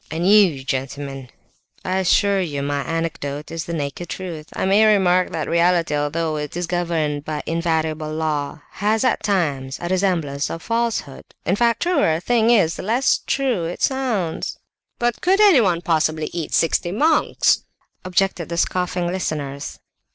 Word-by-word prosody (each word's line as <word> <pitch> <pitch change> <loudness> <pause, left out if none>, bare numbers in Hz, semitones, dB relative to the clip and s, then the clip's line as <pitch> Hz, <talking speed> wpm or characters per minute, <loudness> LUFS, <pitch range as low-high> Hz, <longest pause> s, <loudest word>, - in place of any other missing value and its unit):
And 165 +3 -1
you, 190 -10 +5
gentlemen, 135 0 -4 0.6
I 185 +1 0
assure 195 +1 +3
you 145 -6 -3
my 145 0 -1
anecdote 150 -1 -4
is 165 -1 -4
the 170 - -5
naked 155 +2 -4
truth. 165 -5 -6
I - - -2
may 200 +3 +4
remark 185 -3 +3
that - - -3
reality, 170 -2 +2
although 155 +2 -1
it 150 +2 -5
is 175 - -1
governed 165 -4 -1
by 150 -1 -4
invariable 160 -2 -1
law, 155 -1 -2
has 215 +3 0
at 255 - +1
times 145 -11 -1
a 175 - -4
resemblance 175 -7 0
to - - -4
falsehood. 230 - -2 0.2
In 180 - +2
fact, 235 0 +2
the 345 - 0
truer 165 - +3
a - - -2
thing 230 +4 +2
is 195 -9 +3
the - - -5
less 235 +7 +2
true 255 -11 0
it 170 - -5
sounds." 240 -11 -1 0.4
"But 240 0 -1
could 380 +2 +3
anyone 235 - +5
possibly 155 -2 0
eat 165 -3 -4
sixty 170 +1 +1
monks?" 300 - +2 0.4
objected 185 -2 0
the 170 - -3
scoffing 180 0 0
listeners. 150 -6 -3
170 Hz, 160 wpm, -21 LUFS, 155-195 Hz, 0.6 s, you